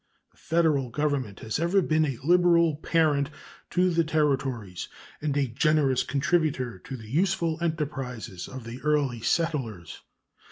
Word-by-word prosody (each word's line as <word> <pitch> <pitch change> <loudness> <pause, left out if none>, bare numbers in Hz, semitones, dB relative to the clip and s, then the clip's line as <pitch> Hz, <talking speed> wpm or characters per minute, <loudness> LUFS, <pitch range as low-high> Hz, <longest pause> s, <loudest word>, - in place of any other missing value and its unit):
The - - -32
Federal 155 -6 +1
Government 135 -6 -2
has 110 +5 -2
ever 170 +4 +3
been 155 -3 +2
a 135 -5 -3
liberal 170 -1 +4
parent 150 -3 +2 0.4
to 180 +1 +2
the 170 0 +2
Territories 135 - -1 0.3
and 145 -2 -1
a 140 - +3
generous 135 +1 +2
contributor 140 - 0
to 130 - -7
the 110 -2 -11
useful 170 - 0
enterprises 135 - -3
of 130 -2 -8
the 115 +3 -8
early 145 -6 +1
settlers. 115 - -2
145 Hz, 135 wpm, -27 LUFS, 125-165 Hz, 0.4 s, liberal